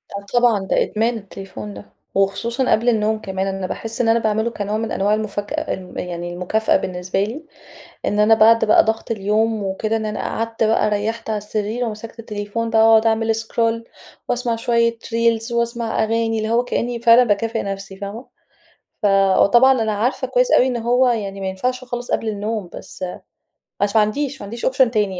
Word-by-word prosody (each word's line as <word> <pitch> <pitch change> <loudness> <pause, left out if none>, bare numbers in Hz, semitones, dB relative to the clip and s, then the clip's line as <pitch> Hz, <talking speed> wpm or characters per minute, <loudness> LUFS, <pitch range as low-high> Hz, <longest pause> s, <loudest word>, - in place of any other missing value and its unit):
آه 200 0 -6
طبعًا 240 -3 +4
ده - - +2
إدمان 225 +2 -1
التليفون 190 - -9
ده. 100 0 -10 0.3
وخصوصًا 230 +6 0
قبل 235 +3 +3
النوم 220 -1 +1
كمان. 190 -1 -3
أنا 195 -1 -3
باحِس 225 +4 -4
إن 230 - +2
أنا 230 +1 +4
باعمله 220 +1 0
كنوع 210 -1 -3
من 225 0 -3
أنواع 200 +2 +1
المُفَكأ 205 -1 -2
ام 185 -1 -8
يعني 175 0 -5
المكافأة 185 +5 +1
بالنسبة 185 +2 -2
لي، 260 +10 -6 0.6
إن 205 - 0
أنا 215 +1 +6
بعد 225 +1 +5
بقى 215 - +5
ضغط 220 +1 -2
اليوم 215 +1 0
وكده 205 +3 -1
إن 220 -1 -3
أنا 210 - -3
قعدت 225 0 -2
بقى 215 -1 +2
ريَّحت 220 +2 -2
على 215 - 0
السرير 210 +3 -3
ومسكت 225 +1 -7
التليفون 215 +1 -4
بقى 225 0 +5
واقعد 225 0 +5
أعمل 225 0 +2
scroll، 230 +1 -1 0.4
واسمع 245 -2 0
شوية 230 0 +1
Reels، 230 0 0
واسمع 235 -1 -1
أغاني. 225 0 0
اللي 215 0 -2
هو 235 +2 +2
كإني 240 -1 -2
فعلًا 235 +1 +6
باكافئ 225 +1 0
نفسي 195 -1 -6
فاهمة؟ 205 +5 -7 0.8
ف 210 - +3 0.3
وطبعًا 245 +3 +5
أنا 220 -1 0
عارفة 225 +6 -1
كويس - - +1
أوي 255 - +5
إن 255 -2 -1
هو 245 +2 +2
يعني 200 -5 -2
ما 190 - -3
ينفعش 250 +7 -2
خالص 245 -1 -5
قبل 225 - 0
النوم. 210 -2 -3
بس 185 - -8 0.8
بس 205 +1 0
ما 220 - +6
عنديش 270 +6 -2
ما - - -6
عنديش 230 +4 -6
أوبشن 260 -2 +3
يعني 200 -4 0
220 Hz, 185 wpm, -20 LUFS, 205-230 Hz, 0.8 s, أنا